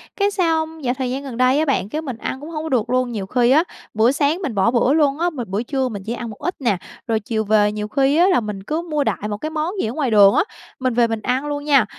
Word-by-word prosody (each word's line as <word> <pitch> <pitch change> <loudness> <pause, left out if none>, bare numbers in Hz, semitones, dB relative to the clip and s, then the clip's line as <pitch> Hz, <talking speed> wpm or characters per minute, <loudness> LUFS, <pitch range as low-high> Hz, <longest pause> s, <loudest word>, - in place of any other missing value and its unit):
cái 405 0 +1
xong 320 -4 -1
dạo 245 0 +1
thời 255 -2 -2
gian 275 +2 -3
gần 250 -4 -7
đây 255 +3 +3
á 315 - +2
bạn, 205 -8 0
cái 310 +5 -3
mình 260 -7 -6
ăn 265 - -4
cũng 305 - -8
hông 310 -1 -4
có 320 - -4
được 245 -2 0
luôn. 255 -1 +1
Nhiều 205 -4 -4
khi 245 +4 +2
á, 310 +4 +5 0.3
bữa 225 +4 +4
sáng 295 +6 +1
mình 270 - -3
bỏ 200 +4 +3
bữa 250 +3 +3
luôn 295 -1 +2
á, 350 +1 +2
m 305 - -13
bữa 200 +5 -2
trưa 265 0 -1
mình 200 -3 -6
chỉ 230 - -3
ăn 240 -1 -5
một 210 - -10
ít 355 +5 -3
nè, 210 -7 +1 0.3
rồi 225 -1 +1
chiều 220 +1 -2
về 210 0 +3
nhiều 210 0 -4
khi 275 +5 +2
á 355 +2 +5
là 365 - +4
mình 210 -3 -5
cứ 310 +8 -2
mua 295 -2 +1
đại 210 - -2
một 205 - -3
cái 310 - -4
món 315 +4 -2
gì - - -1
ở 230 - -4
ngoài 270 -6 -1
đường 200 -2 +7
á, - - +4 0.4
mình 255 -2 0
về 235 -1 +3
mình 225 -1 -3
ăn 255 +5 -1
luôn 290 0 -3
nha, 275 -6 +4
255 Hz, 305 wpm, -20 LUFS, 220-300 Hz, 0.4 s, đường